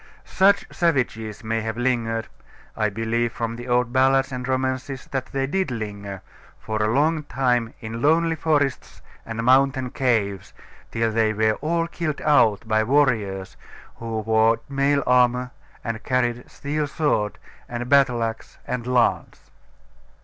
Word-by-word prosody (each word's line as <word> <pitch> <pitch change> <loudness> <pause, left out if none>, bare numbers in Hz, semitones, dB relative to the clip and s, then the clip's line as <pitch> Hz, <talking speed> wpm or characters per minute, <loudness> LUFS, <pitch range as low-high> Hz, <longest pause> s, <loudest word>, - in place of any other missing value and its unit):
Such 200 +1 +3
savages 120 - -1
may 115 0 -1
have 110 +1 -4
lingered 115 -3 -1 0.5
(I 110 -1 +1
believe, 115 +3 -1
from 115 -1 -3
the 120 +1 -8
old 120 -1 +1
ballads 135 +1 +3
and 125 -1 -4
romances, 130 0 -2
that 135 -2 -2
they 135 0 -2
did 190 +5 -1
linger) 100 -4 -6 0.3
for 110 -1 -3
a 105 0 +2
long 155 +5 +2
time 125 -4 0
in 115 +1 -6
lonely 165 +3 +3
forests 145 -4 -1 0.2
and 115 0 -4
mountain 130 0 +3
caves, 105 -7 -1 0.4
till 115 0 0
they 110 -1 +2
were 110 +1 +2
all 165 +2 0
killed 170 -3 -3
out 115 -8 +3
by 110 0 +2
warriors 110 -8 +1 0.4
who 115 -1 -4
wore 110 +1 +3
mail 140 0 +1
armour 125 0 +3 0.3
and 115 -1 -4
carried 120 -2 -1
steel 150 +1 -3
sword, 140 -8 0 0.3
and 120 0 -4
battle 135 -4 +4
axe, 115 0 -5
and 125 -1 -4
lance. 125 -2 0
120 Hz, 140 wpm, -23 LUFS, 110-135 Hz, 0.5 s, battle